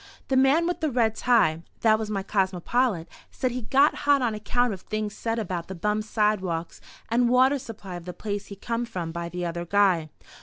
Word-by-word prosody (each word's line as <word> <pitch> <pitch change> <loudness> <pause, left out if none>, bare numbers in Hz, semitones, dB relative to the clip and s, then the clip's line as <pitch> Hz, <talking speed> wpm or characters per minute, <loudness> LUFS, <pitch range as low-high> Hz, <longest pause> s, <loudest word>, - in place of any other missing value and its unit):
"The 265 - +2
man 270 +6 +4
with 350 +1 -1
the 315 - 0
red 230 -4 +2
tie" 165 -11 +3 0.2
(that 220 -1 +4
was 220 -1 -3
my 195 -2 -2
cosmopolite), 195 +1 0 0.2
said 255 - -2
he, 250 +1 -4
"got 275 +6 +4
hot 285 -2 +2
on 230 -3 +1
account 245 +2 0
of 190 - -8
things 215 -1 -3
said 225 +1 -2
about 180 -6 -3
the 190 - -6
bum 210 +4 0
sidewalks 210 -6 -1 0.3
and 240 +1 +3
water 260 +3 +4
supply 215 -7 -8
of 170 - -11
the 180 - -5
place 205 +2 -4
he 200 - -8
come 230 +4 -3
from 170 -6 -4
by 170 0 -4
the 180 0 -4
other 170 0 -3
guy." 180 -4 +2
215 Hz, 205 wpm, -26 LUFS, 180-245 Hz, 0.3 s, man